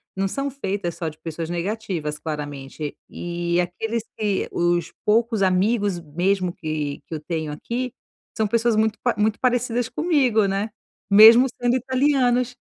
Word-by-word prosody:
não 195 0 0
são 275 +8 -2
feitas 200 - -3
só 165 - -4
de 155 - -14
pessoas 165 0 -5
negativas, 175 -4 -3
claramente. 145 -1 -5
E 175 0 -2
aqueles 220 +6 -3
que 205 -3 -1
os 175 0 0
poucos 225 0 +2
amigos 195 0 +2
mesmo 180 +4 0
que 155 -4 -4
que 165 - -5
eu - - -4
tenho 160 0 -4
aqui, 240 +11 -4 0.4
são 220 - +2
pessoas 230 +1 +2
muito 220 0 +1
pa 245 - +1
muito 215 +1 +1
parecidas 245 -1 +1
comigo, 265 - +2
né. 195 +3 -1 0.4
Mesmo 225 +5 +9
sendo 245 0 +2
italianos. 255 -1 +1
200 Hz, 145 wpm, -23 LUFS, 170-235 Hz, 0.4 s, Mesmo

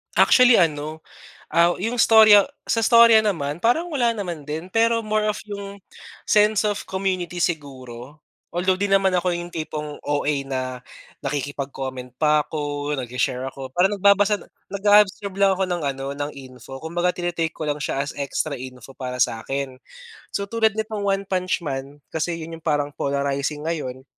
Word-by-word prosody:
Actually, 250 -2 +6
ano, 155 -3 0 0.5
aw 170 +2 +3
yung 225 +6 -2
istorya 220 -3 +8 0.2
sa 225 - +1
istorya 230 -1 +7
naman, 165 -6 -2
parang 245 +10 +2
wala 245 -5 +2
naman 180 -8 -4
din. 155 +4 -5
Pero 230 0 +3
more 215 0 +1
of 210 - -4
yung 200 -1 -7 0.5
sense 210 0 +3
of 205 -1 -1
community 185 -2 -2
siguro. 140 -5 -4 0.3
Although 185 +2 0
di 200 - +1
naman 195 -1 +3
ako 180 0 +1
yung 175 0 -7
tipong 150 -2 -5
OA 145 0 0
na 130 -1 -3 0.4
nakikipag-comment 135 -2 -5
pa 150 +1 +3
ako, 145 -1 -3
nagshi-share 125 0 -2
ako. 135 -1 -8
Parang 190 +3 +3
nagbabasa 200 +1 +4 0.3
nag-a-absorb 200 -1 +3
lang 195 -1 +4
ako 190 0 -1
ng 175 -2 -2
ano, 135 -1 -3
ng 145 +1 -3
info. 135 0 -11
Kumbaga 175 +3 -1
tini-take 175 -2 -2
ko 155 -2 -5
lang 145 - 0
siya 145 -2 -2
as 140 +1 -4
extra 140 +1 -2
info 130 0 -10
para 125 -1 -5
sa'kin. 130 +4 -1 0.6
So, 200 0 -3
tulad 220 0 +2
nitong 215 -1 -3
One 195 0 0
Punch 185 -1 0
Man, 140 -2 -6
kasi 165 +1 -2
'yon 165 +1 -7
yung 160 - -17
parang 145 -2 +1
polarizing 140 +1 -2
ngayon, 130 -6 -4
165 Hz, 160 wpm, -23 LUFS, 140-200 Hz, 0.6 s, istorya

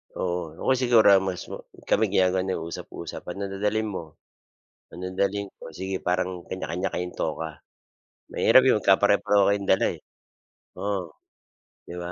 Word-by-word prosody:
Oo, 85 -3 -3
o - - -5
kaya 130 - +3
siguro 120 -4 +6 0.2
mas 90 -2 -3
ma - - -4 0.3
kami 110 - +3
ginagawa 95 -1 +2
namin 95 -3 -2
usap-usap, - - -7
ano 100 +3 -5
dadalhin 105 +2 0
mo, 85 - -4 0.9
ano 90 - -9
dadalhin 100 +2 -1
ko? - - -23 0.2
Sige, 95 +1 -3
parang 90 +1 +1 0.2
kanya-kanya 95 0 -3
kayong 90 0 -4
toka. 80 +1 -2 0.8
Mahirap 130 - +6
'yong 130 - +5
magkapare-pareho 100 +1 +4
kayong 100 -1 -1
dala, 95 - +4
eh. - - -16 0.8
Oo, 100 -4 -2 0.8
di 85 - -7
ba? 85 - -5
95 Hz, 150 wpm, -25 LUFS, 90-100 Hz, 0.9 s, siguro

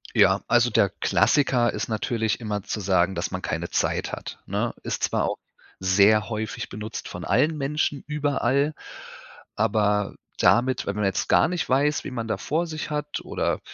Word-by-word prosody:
Ja, 100 -2 +5
also 120 +1 +4
der 100 -3 +3
Klassiker 125 -1 +2
ist - - -3
natürlich 110 0 -1
immer 105 -3 -3
zu 105 - -4
sagen, 95 -1 +2
dass 85 +3 -2
man 90 - -4
keine 85 +1 -3
Zeit - - 0
hat. - - -6
Ne, - - -2
ist - - -3
zwar - - +1
auch - - -2 0.4
sehr 100 +3 +4
häufig 110 +1 -4
benutzt 105 +2 -6
von - - -7
allen 155 +1 +2
Menschen 145 0 -1
überall, 145 -1 0 0.8
aber 105 -1 +1 0.2
damit 125 +2 +3
wenn 100 - -2
man 105 -1 0
jetzt 95 - -1
gar - - +5
nicht 175 -1 -2
weiß, 145 +3 +2
wen 130 - -6
man 115 -2 -3
da 110 - -1
vor 165 +3 -1
sich 155 -1 -5
hat 150 0 -3
oder - - -1
115 Hz, 175 wpm, -25 LUFS, 105-145 Hz, 0.8 s, Ja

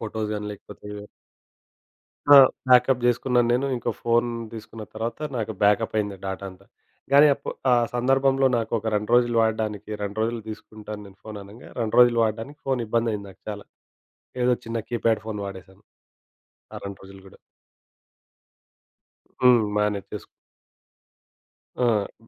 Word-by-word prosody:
Photos 110 -1 -4
గాని 105 0 -4
లేకపోతే 105 0 -13 1.5
ఆ! - - +12 0.3
బాకప్ 125 0 +5
చేసుకున్నాను 120 0 +2
నేను, 135 +3 +1
ఇంకో 120 - -2
ఫోను 120 0 +2 0.2
తీసుకున్న 110 0 -9
తర్వాత 115 +5 -4 0.2
నాకు 110 -1 -2
బాకప్ 105 +2 +3
అయ్యింది 105 -2 -1
డేటా 95 +1 -4
అంతా. 95 +1 -17 0.5
కానీ 145 +2 +8
అప్పు 140 - -7 0.2
ఆ - - +7 0.2
సందర్భంలో 135 +2 +3
నాకు 115 -1 -3
ఒక 110 - -6
2 105 +1 -2
రోజులు 120 -1 +4
వాడడానికి 110 -2 -1
2 100 +1 -5
రోజులు 115 0 -1
తీసుకుంటాను 105 0 -8
నేను 100 0 -15
ఫోను 110 -1 -8
అనంగా 100 +4 -13
2 115 -1 -1
రోజులు 120 -1 +6
వాడడానికి 115 +7 -3
ఫోను 130 -3 0
ఇబ్బంది 115 +1 +1
అయింది 100 -1 -5
నాకు. 95 - -18
చాలా. 105 -1 -7 0.8
ఏదో 125 0 +4
చిన్న 115 0 -2
కీప్యాడ్ 115 -2 0
ఫోన్ 105 -2 -4
వాడేశాను 95 -1 -11 0.9
ఆ - - -6
2 100 -1 -7
రోజులు 95 0 -13
కూడా. - - -17 2.0
హ్మ్. 125 -3 +6
బానే 105 -1 +1
తీసుకు 105 - -6 1.5
ఆ! 115 -2 -1
110 Hz, 140 wpm, -24 LUFS, 105-120 Hz, 2.0 s, ఆ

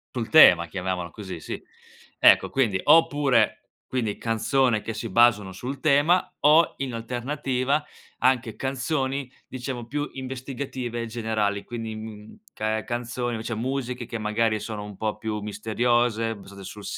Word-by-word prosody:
Sul 115 -3 -3
tema, 90 - +8
chiamiamolo 90 -1 -3
così, 95 -6 -8
sì. - - -6 0.6
Ecco, - - +6
quindi 110 -8 +1
oppure, 145 -8 +4 0.2
quindi 115 -5 -1
canzone 115 0 +1
che 115 - -4
si 110 +1 -5
basano 110 -5 +4
sul 130 +7 -6
tema, 155 +5 +3
o 155 +3 +5
in 135 -3 -4
alternativa, 130 +4 -1 0.4
anche 125 -3 +1
canzoni, 135 0 -2 0.2
diciamo, 125 -2 -6
più 145 +3 -2
investigative 130 -2 -5
generali, 110 -3 -1
quindi, 115 -2 -6
mhmm 110 - -10
ca 110 0 -2
canzoni 120 -1 -3
cioè 115 - -3
musiche, 125 0 -3
che 115 - -5
magari 110 +1 0
sono 105 -1 -5
un 105 -1 -9
po' 110 -1 -2
più 105 -1 -3
misteriose, 115 +2 0
basate 100 -1 -12
sul 100 +2 -9
115 Hz, 140 wpm, -25 LUFS, 110-130 Hz, 0.6 s, tema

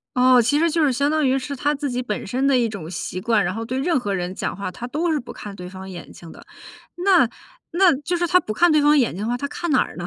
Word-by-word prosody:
哦， 255 0 +5
其 250 +6 +2
实 335 - +3
就 325 0 +1
是 270 - +2
相 280 +3 +1
当 310 -1 +1
于 265 +1 +2
是 280 +1 -5
他 290 +3 0
自 290 -1 -3
己 250 0 -2
本 210 -4 -4
身 255 +6 -1
的 275 -1 +4
一 235 -2 +2
种 190 -7 -7
习 180 +1 -5
惯， 210 +1 +2
然 175 +2 -1
后 225 0 -4
对 255 +2 -3
任 315 0 +1
何 205 -4 -3
人 180 -1 -3
讲 - - -3
话， 195 -2 -5
他 235 - -7
都 320 +6 -1
是 305 - +1
不 240 - -9
看 205 -1 -9
对 180 -1 -8
方 190 +1 -9
眼 180 -2 -9
睛 165 -2 -12
的。 - - -14 0.5
那 355 - +4 0.4
那 355 -2 +4
就 350 +5 -2
是 345 0 0
他 365 - +5
不 215 -11 -5
看 345 +7 +4
对 305 - +4
方 295 +1 +4
眼 245 - +1
睛 200 - -5
的 220 - -2
话， 240 - 0
他 280 +3 -3
看 340 +3 -4
哪 260 - +4
儿 - - -4
呢？ 175 - -5
255 Hz, 330 characters per minute, -22 LUFS, 205-300 Hz, 0.5 s, 哦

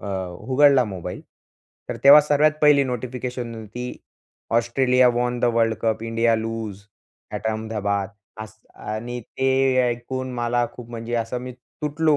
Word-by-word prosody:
अ, - - -8 0.3
उघडला 135 +2 +4
मोबाईल, 95 -5 -6 0.7
तर - - -3
तेव्हा 145 +2 +10
सर्वात 150 +1 +3
पहिली 145 -2 +6
नोटिफिकेशन 125 -1 -4
होती 115 +3 -7 0.6
Australia 125 +2 +3
won 120 0 0
the - - +2
world 115 -1 +2
cup 110 -1 0
India 115 0 +1
loose 110 -3 -5 0.5
at 110 - -5
Ahmedabad 105 -3 -2 0.3
असं 110 +1 -16
आणि 120 +3 -5
ते 130 +3 -2 0.4
ऐकून 130 +2 -4
मला 120 0 0
खूप 120 -2 -11
म्हणजे 115 0 -5
असं 115 +1 -2
मी 125 0 -7 0.3
तुटलो 150 +1 +2
120 Hz, 140 wpm, -23 LUFS, 110-130 Hz, 0.7 s, तेव्हा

